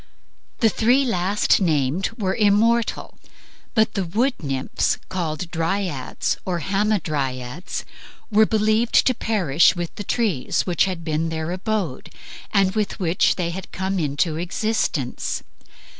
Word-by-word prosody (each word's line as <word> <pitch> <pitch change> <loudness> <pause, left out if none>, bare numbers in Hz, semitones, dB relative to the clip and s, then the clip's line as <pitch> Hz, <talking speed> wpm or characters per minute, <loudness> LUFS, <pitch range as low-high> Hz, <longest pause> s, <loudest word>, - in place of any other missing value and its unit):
The 225 - +5
three 245 +6 +3
last 200 -2 +2
named 155 0 +1
were 190 -3 0
immortal, 225 +3 +2 0.6
but 220 -1 +3
the 195 - -1
wood 225 +10 +1
nymphs, 135 -3 -1
called 170 -2 -3
Dryads 165 -4 -1
or 180 -2 -2
Hamadryads, 155 - -2 0.5
were 215 +1 +5
believed 220 +2 +3
to 255 - +4
perish 180 - +3
with 175 -1 -4
the 205 - -4
trees 205 - 0
which 175 -1 +2
had 180 -3 -4
been 160 0 -1
their 160 +1 -3
abode 185 - -3 0.4
and 195 -2 +3
with 215 -2 -2
which 175 -1 +2
they 170 -2 -2
had 190 +2 -7
come 190 0 -2
into 155 +1 0
existence. 175 - -1
185 Hz, 130 wpm, -22 LUFS, 160-215 Hz, 0.6 s, The